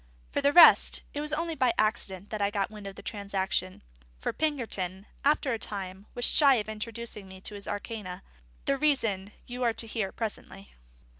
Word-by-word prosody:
For 285 Hz, -, 0 dB
the 280 Hz, 0 st, +4 dB
rest, 345 Hz, +2 st, +8 dB
it 290 Hz, -, -3 dB
was 300 Hz, 0 st, -1 dB
only 330 Hz, +2 st, -1 dB
by 255 Hz, -6 st, +2 dB
accident 210 Hz, -2 st, -1 dB
I 200 Hz, -2 st, +1 dB
got 205 Hz, -1 st, -1 dB
wind 210 Hz, -2 st, -9 dB
of 195 Hz, -, -8 dB
the -, -, -11 dB
transaction; 195 Hz, -3 st, -2 dB, 0.4 s
for -, -, -2 dB
Pinkerton, 210 Hz, -, -2 dB, 0.2 s
after 285 Hz, -2 st, +2 dB
a 225 Hz, -, -2 dB
time, 195 Hz, -1 st, -6 dB
was 245 Hz, -, +2 dB
shy 280 Hz, -3 st, +6 dB
of 215 Hz, -3 st, -1 dB
introducing 220 Hz, -1 st, -6 dB
me 190 Hz, 0 st, -11 dB
to 210 Hz, -, -6 dB
his 200 Hz, -1 st, -8 dB
arcana: 205 Hz, -3 st, -5 dB, 0.4 s
the 275 Hz, -, +2 dB
reason 225 Hz, -10 st, +1 dB
you 245 Hz, +1 st, -7 dB
are 235 Hz, -2 st, +2 dB
to 225 Hz, -, -5 dB
hear 215 Hz, -3 st, -2 dB
presently. 200 Hz, -3 st, -6 dB
215 Hz, 180 wpm, -29 LUFS, 195-255 Hz, 0.4 s, rest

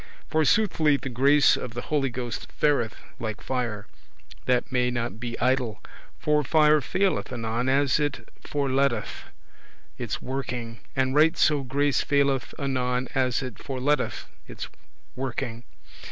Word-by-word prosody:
For 155 Hz, 0 st, +3 dB
soothly 165 Hz, -7 st, +3 dB
the 135 Hz, -, -5 dB
grace 140 Hz, +4 st, +5 dB
of 120 Hz, -2 st, -6 dB
the 120 Hz, -, -3 dB
Holy 145 Hz, -3 st, 0 dB
Ghost 120 Hz, -1 st, -5 dB
fareth 140 Hz, -7 st, +1 dB, 0.2 s
like 110 Hz, -2 st, -4 dB
fire, 120 Hz, -5 st, -3 dB, 0.6 s
that 125 Hz, +2 st, +1 dB
may 125 Hz, -1 st, +2 dB
not 120 Hz, -2 st, -3 dB
be 120 Hz, 0 st, -5 dB
idle; 125 Hz, -4 st, +1 dB, 0.4 s
for 150 Hz, 0 st, +2 dB
fire 150 Hz, +1 st, +4 dB
faileth 190 Hz, -1 st, 0 dB
anon 120 Hz, +1 st, -1 dB
as 140 Hz, +1 st, +3 dB
it 145 Hz, -1 st, -2 dB, 0.2 s
forleteth 140 Hz, -1 st, +1 dB
[leaveth] -, -, -9 dB, 0.7 s
its -, -, -3 dB
working, 120 Hz, -4 st, -4 dB, 0.2 s
and 130 Hz, -1 st, +1 dB
right 160 Hz, +3 st, +4 dB
so 150 Hz, -3 st, +3 dB
grace 140 Hz, +2 st, +1 dB
faileth 140 Hz, -3 st, +1 dB
anon 125 Hz, -2 st, -1 dB
as 130 Hz, +1 st, +1 dB
it 125 Hz, -3 st, -7 dB
forleteth 140 Hz, +2 st, -1 dB, 0.2 s
its -, -, -7 dB, 0.5 s
working. 125 Hz, -2 st, -4 dB
130 Hz, 140 wpm, -26 LUFS, 125-145 Hz, 0.7 s, grace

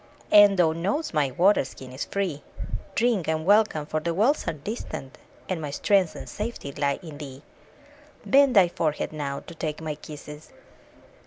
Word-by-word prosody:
And 205 Hz, -1 st, +8 dB
thou 170 Hz, -3 st, +4 dB
know'st 195 Hz, -, -2 dB
my 150 Hz, -3 st, +2 dB
water 185 Hz, +9 st, +3 dB
skin 130 Hz, -1 st, -10 dB
is 130 Hz, -, -4 dB
free: 185 Hz, -8 st, -2 dB, 0.5 s
Drink 225 Hz, -7 st, +1 dB
and 160 Hz, 0 st, -1 dB
welcome, 205 Hz, -6 st, +3 dB
for 155 Hz, -, -2 dB
the 170 Hz, +1 st, -2 dB
wells 235 Hz, -, +2 dB
are 165 Hz, -, 0 dB
distant, 150 Hz, -, -7 dB, 0.3 s
And 180 Hz, -4 st, -2 dB
my 150 Hz, -, -4 dB
strength 185 Hz, +4 st, +2 dB
and -, -, -8 dB
safety 210 Hz, -9 st, -5 dB
lie 140 Hz, 0 st, 0 dB
in 155 Hz, -4 st, -9 dB
thee. 140 Hz, -1 st, -9 dB, 0.8 s
Bend 275 Hz, -2 st, +5 dB
thy 190 Hz, -3 st, +7 dB
forehead 155 Hz, -3 st, -2 dB
now, 140 Hz, -2 st, -4 dB
to -, -, -11 dB
take 155 Hz, -2 st, -4 dB
my 155 Hz, -1 st, -3 dB
kisses! 150 Hz, 0 st, -11 dB
160 Hz, 170 wpm, -26 LUFS, 150-200 Hz, 0.8 s, And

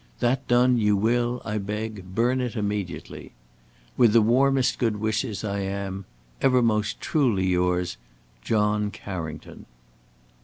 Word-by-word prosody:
That 130 Hz, +3 st, 0 dB
done, 125 Hz, 0 st, +4 dB
you 105 Hz, -2 st, +3 dB
will, 120 Hz, +3 st, 0 dB
I 105 Hz, -1 st, -2 dB
beg, 105 Hz, -2 st, -5 dB
burn 125 Hz, +3 st, +2 dB
it 125 Hz, -1 st, -3 dB
immediately. 105 Hz, -4 st, -4 dB, 0.6 s
"With 120 Hz, -4 st, +5 dB
the 115 Hz, -, +6 dB
warmest 130 Hz, +3 st, +2 dB
good 115 Hz, -3 st, +1 dB
wishes, 110 Hz, +1 st, -2 dB
I 100 Hz, -1 st, -2 dB
am, 95 Hz, 0 st, -4 dB, 0.4 s
"Ever 130 Hz, -2 st, +4 dB
most 105 Hz, -2 st, 0 dB
truly 120 Hz, -11 st, +1 dB
yours, 90 Hz, -2 st, 0 dB, 0.4 s
"John 105 Hz, -, +1 dB
Carrington." 80 Hz, -7 st, -8 dB
105 Hz, 125 wpm, -25 LUFS, 100-120 Hz, 0.6 s, the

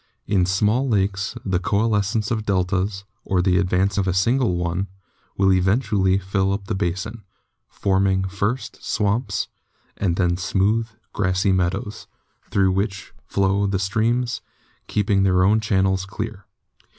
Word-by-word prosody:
In 95 Hz, -3 st, +2 dB
small 105 Hz, +8 st, +1 dB
lakes 100 Hz, -2 st, 0 dB
the 95 Hz, -2 st, +1 dB
coalescence 105 Hz, +2 st, 0 dB
of 110 Hz, -2 st, 0 dB
deltas, 95 Hz, 0 st, 0 dB, 0.2 s
or 95 Hz, -, 0 dB
the 90 Hz, 0 st, +3 dB
advance 95 Hz, +1 st, +1 dB
of 95 Hz, -, 0 dB
a 90 Hz, -, 0 dB
single 115 Hz, +1 st, +2 dB
one, 90 Hz, +2 st, -1 dB, 0.5 s
will 95 Hz, -1 st, +4 dB
eventually 95 Hz, 0 st, +2 dB
fill 95 Hz, 0 st, 0 dB
up 100 Hz, 0 st, -4 dB
the 105 Hz, -, -3 dB
basin, 100 Hz, +4 st, -3 dB, 0.5 s
forming 95 Hz, -1 st, +1 dB
first 105 Hz, +5 st, -3 dB
swamps 105 Hz, -1 st, 0 dB, 0.5 s
and 90 Hz, -4 st, 0 dB
then 90 Hz, -1 st, +1 dB
smooth, 105 Hz, +5 st, +1 dB, 0.2 s
grassy 95 Hz, 0 st, +1 dB
meadows, 95 Hz, +4 st, -1 dB, 0.4 s
through 95 Hz, -1 st, +3 dB
which 100 Hz, +2 st, -2 dB
flow 100 Hz, +1 st, +1 dB
the 95 Hz, -1 st, 0 dB
streams, 115 Hz, +4 st, 0 dB, 0.5 s
keeping 100 Hz, -1 st, +1 dB
their 90 Hz, -1 st, +3 dB
own 105 Hz, +4 st, +4 dB
channels 95 Hz, -2 st, +1 dB
clear. 105 Hz, -1 st, -6 dB
100 Hz, 135 wpm, -22 LUFS, 95-105 Hz, 0.5 s, will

